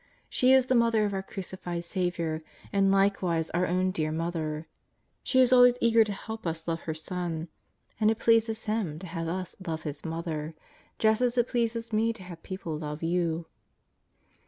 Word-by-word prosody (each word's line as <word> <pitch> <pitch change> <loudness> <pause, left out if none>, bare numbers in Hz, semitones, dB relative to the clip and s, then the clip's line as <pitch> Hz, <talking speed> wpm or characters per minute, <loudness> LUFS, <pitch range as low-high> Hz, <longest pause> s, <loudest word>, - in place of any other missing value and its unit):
She 255 +1 +3
is 265 -1 +6
the 255 - +1
Mother 230 -3 +4
of 205 - -2
our 190 - -1
Crucified 180 -3 -5
Saviour, 170 -3 -1 0.3
and 195 -1 +4
likewise 190 -4 +2
our 180 +2 +1
own 185 +1 +1
dear 155 -4 -1
Mother. 160 -1 -2 0.6
She 260 - +2
is 255 0 +6
always 245 -1 +7
eager 230 -2 +5
to 210 - -4
help 220 0 -6
us 165 0 -4
love 165 0 -1
her - - 0
Son. 165 0 -4 0.5
And 215 -1 +4
it 220 - +1
pleases 225 -1 +2
Him 210 -8 -1
to 185 - -8
have 165 -1 -4
us 185 +2 -3
love 160 -1 -3
His 145 -1 -5
Mother, 160 -1 -4 0.4
just 220 +1 +3
as 250 0 +1
it 240 0 +3
pleases 230 -1 -1
me 225 +2 +2
to 215 -4 -12
have 175 -2 -10
people 185 -4 -5
love 150 0 -5
you. 170 -1 0
185 Hz, 180 wpm, -28 LUFS, 165-225 Hz, 0.6 s, always